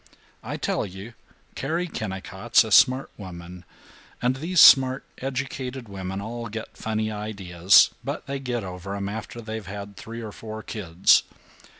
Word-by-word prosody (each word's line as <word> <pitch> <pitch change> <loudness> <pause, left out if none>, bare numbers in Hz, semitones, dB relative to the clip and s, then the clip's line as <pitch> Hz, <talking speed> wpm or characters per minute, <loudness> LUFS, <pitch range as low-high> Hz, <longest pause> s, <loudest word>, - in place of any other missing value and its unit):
I - - -5
tell - - -1
you, 95 +5 -8 0.4
Carrie 165 +6 -2
Kennicott's 95 - 0
a 110 - -7
smart 130 +5 +5
woman, 90 -2 -9 0.5
and 125 +2 +1
these 170 +5 0
smart 130 -1 +7
educated 130 -1 -4
women 95 -1 -5
all 115 +2 -5
get 110 +1 -7
funny 110 -1 -2
ideas, 100 -4 +3
but - - -4
they 140 0 -4
get 120 -4 -3
over 95 +1 -6
'em 100 -1 -3
after 110 +3 -6
they've 110 -3 -6
had 100 0 -8
three 115 +3 -8
or 110 - -6
four 110 +1 -8
kids. 90 -5 +3
110 Hz, 150 wpm, -25 LUFS, 95-125 Hz, 0.5 s, smart